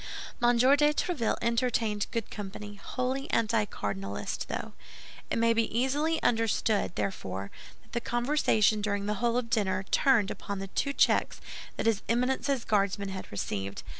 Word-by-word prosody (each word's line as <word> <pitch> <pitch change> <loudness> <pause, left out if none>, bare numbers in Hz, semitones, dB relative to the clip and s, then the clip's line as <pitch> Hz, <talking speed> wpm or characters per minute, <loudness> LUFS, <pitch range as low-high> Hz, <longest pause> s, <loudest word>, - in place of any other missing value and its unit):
M. 240 0 +4
de 240 - +4
Tréville 295 -1 +3
entertained 230 -3 +1
good 230 -2 -3
company, 205 0 -7
wholly 260 +2 -2
anticardinalist, 105 - -1
though. - - -4 0.6
It - - 0
may 230 0 +4
easily 260 +7 +1
be 320 - -2
understood, 225 -4 +1
therefore, 95 - -3 0.3
that - - -26
the 235 - -2
conversation 240 -4 +2
during 200 -1 -1
the 210 - 0
whole 240 0 +2
of 235 -2 -2
dinner 190 -4 +1
turned 230 -8 +4
upon 200 - -5
the 195 0 -5
two 280 +8 -1
checks - - +2 0.4
that - - -2
his 225 -3 +2
Eminence's 255 +2 +1
Guardsmen 200 -1 +1
had 190 -1 -7
received. 100 -1 -4
225 Hz, 145 wpm, -29 LUFS, 200-245 Hz, 0.6 s, M